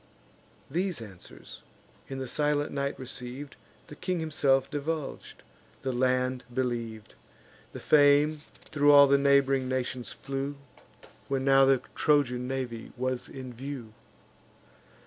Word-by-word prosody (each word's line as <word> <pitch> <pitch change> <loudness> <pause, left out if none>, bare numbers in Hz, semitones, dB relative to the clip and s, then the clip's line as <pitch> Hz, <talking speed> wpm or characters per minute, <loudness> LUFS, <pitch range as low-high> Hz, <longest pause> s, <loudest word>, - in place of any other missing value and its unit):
These 180 -2 -2
answers, 100 -6 -12 0.5
in 135 - -6
the 130 -1 -4
silent 145 +2 0
night 140 0 -2
receiv'd, 130 +2 -7 0.3
The 150 - -11
king 180 +3 -2
himself 140 -4 +1
divulg'd, 150 0 -5 0.4
the 130 - -1
land 130 0 0
believ'd: 120 -4 -3 0.6
The - - -8
fame 145 +1 +4 0.3
thro' 145 -1 +3
all 140 0 +9
the 140 0 +4
neighb'ring 140 -1 +3
nations 130 -1 -3
flew, 135 +1 -4 0.7
When 135 -1 -1
now 135 0 +6
the 135 -1 +3
Trojan 125 -4 +2
navy 125 -3 -4
was 130 0 -2
in 130 -2 -8
view. 125 -3 -7
135 Hz, 120 wpm, -28 LUFS, 125-145 Hz, 0.7 s, all